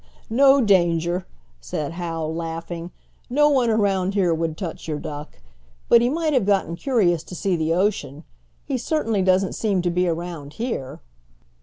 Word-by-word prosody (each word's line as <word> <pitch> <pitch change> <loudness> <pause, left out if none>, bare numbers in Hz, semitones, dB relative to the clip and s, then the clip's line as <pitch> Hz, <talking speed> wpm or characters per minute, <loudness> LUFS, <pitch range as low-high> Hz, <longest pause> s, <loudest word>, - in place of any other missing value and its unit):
"No 270 +3 +6
danger," 175 -3 +2 0.3
said 140 - -4
Hal, 165 -2 -4
laughing. 165 +1 -5 0.4
"No 295 +4 +4
one 260 -5 +3
around 200 -3 +1
here 180 -4 +3
would 160 -1 -2
touch 170 -4 -6
your 155 -2 -2
duck. 145 0 -7 0.5
But 235 - +7
he 240 - +2
might 315 +1 0
have 245 -7 +2
gotten 195 -4 +1
curious 185 - +1
to 180 - -10
see 190 0 0
the 160 0 0
ocean. 170 -7 -1 0.4
He 270 -3 -2
certainly 225 -7 0
doesn't 185 0 +2
seem 200 -5 0
to 175 - +1
be 180 +1 +1
around 165 -3 -4
here." 150 - -4
180 Hz, 160 wpm, -23 LUFS, 165-220 Hz, 0.5 s, But